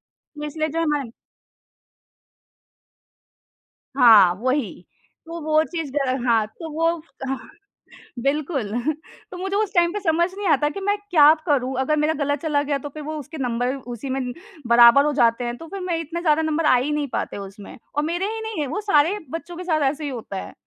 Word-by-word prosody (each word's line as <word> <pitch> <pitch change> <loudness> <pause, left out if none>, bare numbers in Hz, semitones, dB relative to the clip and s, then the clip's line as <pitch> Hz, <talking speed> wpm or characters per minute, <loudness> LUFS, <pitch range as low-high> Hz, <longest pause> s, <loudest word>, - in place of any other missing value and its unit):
तो 300 -1 -11
इसलिए 310 +1 -2
जो 325 +2 -4
है 330 - +1
हमन 290 -6 -1 2.9
हाँ, 215 -8 +7
वही। 255 -1 -1 0.5
तो 335 +1 -7
वो 310 +1 +3
चीज़ 320 -5 -5
ग - - 0 0.3
हाँ। 225 -3 +3
तो 325 -1 -6
वो 330 +2 +1 0.4
हाँ, 270 0 -5 0.7
बिल्कुल 275 -6 -1 0.6
तो 360 - -7
मुझे 385 +2 -3
उस 420 -1 0
टाइम 345 -1 +3
पे 415 - -2
समझ 340 -1 +1
नहीं 405 -2 -2
आता 295 -1 +3
कि 395 - -6
मैं 410 +1 +1
क्या 305 -2 +7
करूँ? 265 -3 +1
अगर 305 +3 +1
मेरा 305 +1 +2
गलत 285 0 -1
चला 300 -3 +1
गया 285 -1 -1
तो - - -4
फिर 300 +1 -9
वो 310 +1 -5
उसके 300 +3 -9
नंबर 245 0 -1
उसी 245 0 -7
में 255 -2 -2 0.3
बराबर 235 +4 +7
हो 300 - +1
जाते 235 -1 +2
हैं, 240 0 -3
तो 330 - -10
फिर 390 +1 -7
मैं 350 -2 -1
इतना 330 +2 -5
ज़्यादा 315 -2 +3
नंबर 315 0 0
आ 255 - +6
ही 275 +5 -1
नहीं 295 -1 -1
पाते - - -3
उसमें। 200 +1 -10 0.2
और 295 - +1
मेरे 350 +5 -1
ही 445 - -5
नहीं 440 -8 -4
है 285 - -2
वो 335 +10 -3
सारे 370 0 +3
बच्चों 335 +1 -6
के 365 - -6
साथ 315 -4 0
ऐसे 305 +1 -8
ही 290 - -2
होता 220 -5 -6
है। - - -10
300 Hz, 200 wpm, -22 LUFS, 260-330 Hz, 2.9 s, हाँ